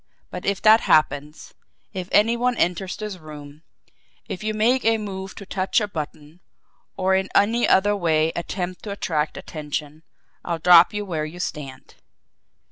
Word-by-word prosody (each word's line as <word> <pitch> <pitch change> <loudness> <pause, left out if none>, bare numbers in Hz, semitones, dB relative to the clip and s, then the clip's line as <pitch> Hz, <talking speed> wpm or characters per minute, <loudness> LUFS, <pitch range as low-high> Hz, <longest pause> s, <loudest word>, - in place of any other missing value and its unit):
But 180 - -6
if 200 -1 -1
that 220 +1 +7
happens, 150 0 +1 0.4
if 185 -1 -5
any 225 +3 +4
one 245 0 0
enters 180 +2 -1
this 210 -3 -6
room, 150 -2 -11 0.7
if 185 - -6
you 215 - -1
make 245 +5 +2
a 225 0 +3
move 190 -2 -6
to 200 - -9
touch 190 +2 0
a 210 - -2
button, 155 -2 -7 0.6
or 190 0 +1
in 190 0 +1
any 225 +4 +3
other 205 +2 +4
way 160 -4 +1
attempt 180 +1 -4
to - - -5
attract 155 -6 -2
attention, 150 0 -6 0.4
I'll 170 -1 -2
drop 175 +1 +7
you 210 0 -4
where 160 -5 -3
you 165 +3 -9
stand!" 140 -6 -7
180 Hz, 160 wpm, -23 LUFS, 155-205 Hz, 0.7 s, that